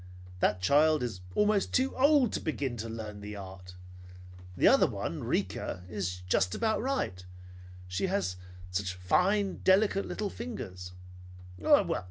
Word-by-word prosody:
That 90 0 +1
child 150 +5 +4
is 110 -7 -4
almost 210 -1 +2
too 260 +1 +1
old 275 -3 +4
to - - -1
begin 140 -5 -2
to 115 +1 -5
learn 110 -2 -7
the 105 +1 -7
art. 95 -2 -10 0.8
The - - +5
other - - +6
one, - - -4
Rika, 90 - -2
is 90 -3 -4
just 90 0 +1
about 220 -1 0
right; 260 - -1
and - - -16 0.6
she 90 - -1
has 185 - -1 0.4
such 90 0 -2
fine, 190 - +1
delicate, 195 +1 +3
little 210 -2 -3
fingers. 90 - -7
115 Hz, 140 wpm, -30 LUFS, -, 0.8 s, other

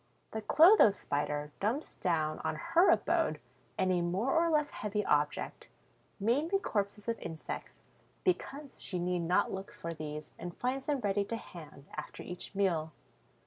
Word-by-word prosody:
The 220 - -3
Clotho 330 - +7
Spider 150 -5 -2
dumps 235 +10 -1
down 155 -4 0
on - - -1
her 340 +2 +4
abode - - +2 0.4
any 185 -2 +2
more 185 +9 0
or 335 +1 +4
less 300 -2 +2
heavy 210 -1 -2
object, 150 0 0 0.5
mainly 285 - +2
corpses 205 - -2
of 230 -1 -1
insects, 160 -1 -7 0.4
because 295 -6 -2
she 180 - -2
need 180 0 0
not 170 +2 +2
look 190 +1 -5
for 170 0 -6
these 150 -1 -6
and 175 -1 -6
finds 260 +2 -2
them 285 -3 +1
ready 205 -1 +1
to 230 - -3
hand 155 -9 -11
after 155 - -6
each 180 +2 -8
meal. 165 -6 +1
195 Hz, 150 wpm, -32 LUFS, 170-270 Hz, 0.5 s, Clotho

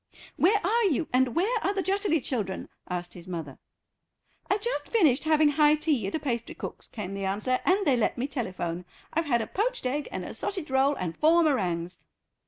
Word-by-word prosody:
"Where 405 +5 +4
are 460 +5 +3
you, 320 -3 +1
and 255 -1 +2
where 440 +7 +2
are 395 - 0
the 385 - 0
Jutterly 390 -5 +1
children?" 210 -7 -3 0.2
asked 175 -1 -4
his 175 -1 -11
mother. 165 -7 -6 0.9
"I've 405 +1 +1
just 480 - -2
finished 310 - +3
having 310 -1 +4
high 295 0 +5
tea 300 -9 0
at 195 - -3
a - - 0
pastry 235 -6 -3
cook's," - - -7
came 200 -4 -6
the 195 0 -3
answer, 210 +7 0
"and 385 +2 +3
they 275 - +4
let 235 0 0
me 245 - -1
telephone. 185 -10 -4 0.3
I've 325 +2 +1
had 235 -4 +2
a - - -4
poached 475 - -2
egg 280 +3 -1
and - - -4
a - - -6
sausage 370 -8 -3
roll 270 +2 +3
and 175 -8 -4
four 330 - +4
meringues." 180 - 0
275 Hz, 200 wpm, -27 LUFS, -, 0.9 s, high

